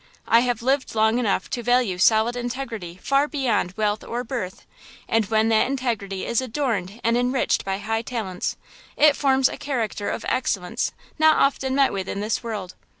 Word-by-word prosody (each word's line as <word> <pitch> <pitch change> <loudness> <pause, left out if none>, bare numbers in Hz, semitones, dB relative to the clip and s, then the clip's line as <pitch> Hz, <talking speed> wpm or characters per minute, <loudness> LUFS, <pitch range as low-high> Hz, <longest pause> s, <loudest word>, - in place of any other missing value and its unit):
I 230 - +6
have 245 -1 -1
lived 265 -1 0
long 220 +2 +3
enough 215 -5 0
to 240 - -2
value 240 -6 +1
solid 220 +4 +4
integrity 235 -8 -5
far 275 +1 +2
beyond 240 - -1
wealth 210 -1 0
or 240 +1 -4
birth, 230 -7 -5 0.4
and 225 -3 +1
when 220 +1 +2
that 220 -1 +3
integrity 230 -8 -2
is 235 +1 +1
adorned 230 -6 -2
and 230 +1 +2
enriched 250 +1 +1
by 195 0 -2
high 225 +2 -2
talents, 220 -7 -4 0.4
it 300 -1 +6
forms 265 -2 +3
a - - -6
character 230 -7 -2
of - - -4
excellence 195 -8 -1 0.3
not 315 0 +5
often 265 -1 +1
met 275 -1 +3
with 190 -1 -3
in - - -3
this 210 +2 -1
world. 210 -6 -5
230 Hz, 175 wpm, -23 LUFS, 210-260 Hz, 0.4 s, I